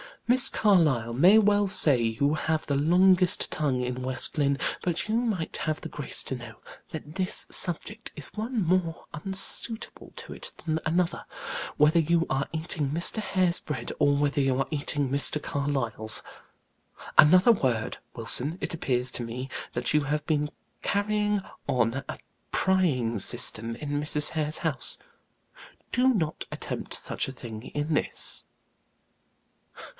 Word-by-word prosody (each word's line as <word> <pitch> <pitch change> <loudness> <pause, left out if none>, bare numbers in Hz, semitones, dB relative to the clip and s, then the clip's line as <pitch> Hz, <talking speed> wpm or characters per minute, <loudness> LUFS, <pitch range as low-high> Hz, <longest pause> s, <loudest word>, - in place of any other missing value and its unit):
"Miss 255 +2 +7
Carlyle 150 - +2
may 175 - +6
well 205 -1 +3
say 150 - +4
you 115 +6 0
have 155 0 -1
the 140 - -1
longest 180 +4 +3
tongue 140 -5 -1
in 125 0 -4
West 130 +4 +1
Lynne; 140 -1 +1 0.2
but 180 +3 -2
you 220 - +1
might 220 -9 -2
have 155 0 -3
the - - -7
grace 145 -3 -3
to 130 - -4
know 120 -3 -10 0.4
that 155 -1 -8
this 185 -1 +2
subject 205 +6 +1
is - - -5
one 220 0 -2
more 170 -1 -1
unsuitable 195 +6 -5
to - - -7
it - - -7
than 160 -1 -1
another, 170 +2 -1 0.5
whether 150 +3 +4
you 165 +1 +2
are 135 +1 0
eating 160 -3 -3
Mr. 170 +8 0
Hare's 185 -5 +1
bread, 150 - -5
or 145 0 +3
whether 145 0 0
you 135 -1 +1
are 135 - -1
eating 145 -2 0
Mr. 140 +2 +3
Carlyle's. 135 -7 -1 0.9
Another 180 +9 +7
word, 125 - -1 0.2
Wilson; 125 +7 +3
it - - -3
appears 130 -5 0
to 120 - -4
me 125 +3 -6 0.2
that 120 +3 -1
you 150 - +3
have 150 +1 -2
been 150 -2 0 0.3
carrying 210 0 0 0.3
on 125 +2 0
a - - -6 0.3
prying 140 - +1
system 115 +1 +4
in 145 +3 -3
Mrs. 150 0 0
Hare's 155 -1 -1
house 160 -5 -2 0.9
do 255 +1 +3
not 165 -10 -2
attempt - - -6
such - - -3
a 135 - -7
thing 115 -4 -9
in 150 +2 -1
this." - - -2
150 Hz, 150 wpm, -27 LUFS, 135-185 Hz, 0.9 s, Miss